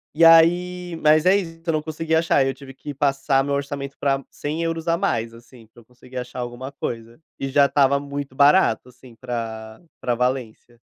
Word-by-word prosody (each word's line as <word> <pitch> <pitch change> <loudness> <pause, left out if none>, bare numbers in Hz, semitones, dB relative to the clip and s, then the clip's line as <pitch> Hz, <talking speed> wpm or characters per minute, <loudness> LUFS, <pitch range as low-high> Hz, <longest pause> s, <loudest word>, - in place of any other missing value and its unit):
e 165 - +3
aí 175 +2 +5
mas 155 +1 +4
é 185 +2 +6
isso, 165 -4 -3
eu 165 - 0
não 155 - 0
consegui 160 +1 -4
achar, 160 -4 +3
eu 135 - -1
tive 135 0 -12
que 145 +2 -8
passar 135 0 +1
meu 140 0 -1
orçamento 140 -1 -5
pra 135 -1 0
100€ 165 +2 -4
a 165 - +3
mais, 115 - -1
assim, 115 0 -16
pra 110 - -33
que - - -17
eu 115 - -19
conseguisse 125 +1 -10
achar 125 0 -7
alguma 125 +2 -6
coisa, 115 -3 -6 0.2
e 135 - -3
já 140 +1 +4
estava 140 0 +3
muito 140 -1 -6
barato, 140 -4 +4
assim, 125 -1 -17
pra 115 -2 -6 0.2
pra 125 - -1
Valência. 120 -1 -3
140 Hz, 200 wpm, -22 LUFS, 125-160 Hz, 0.2 s, é